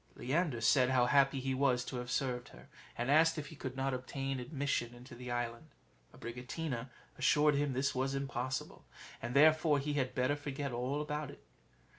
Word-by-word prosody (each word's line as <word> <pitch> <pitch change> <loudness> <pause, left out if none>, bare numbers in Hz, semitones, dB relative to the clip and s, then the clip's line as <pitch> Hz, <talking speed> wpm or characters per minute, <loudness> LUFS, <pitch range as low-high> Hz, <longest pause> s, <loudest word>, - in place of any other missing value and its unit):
Leander 135 -1 0
said 125 +2 +4
how 125 -2 +4
happy 135 +1 +4
he 135 0 -1
was 130 -2 +2
to 125 - -5
have 125 0 -5
served 125 -2 -1
her, - - -15 0.3
and 120 +3 0
asked 160 +2 +5
if 150 - -5
he 160 - -10
could 130 -2 -6
not 135 0 0
obtain 135 +1 -3
admission 125 -3 -2
into 120 +1 -12
the 125 +1 -8
island. 120 +3 -3 0.4
Abricotina 125 +1 -5 0.3
assured 150 0 +4
him 145 -1 +1
this 135 +2 0
was 135 +1 -1
impossible, 135 -1 -3 0.4
and 120 +3 -4
therefore 155 +1 +6
he 145 +1 -2
had 130 -3 -1
better 130 +3 +2
forget 145 -1 -4
all 125 +5 -1
about 150 -1 -3
it. - - -13
135 Hz, 180 wpm, -34 LUFS, 125-145 Hz, 0.4 s, therefore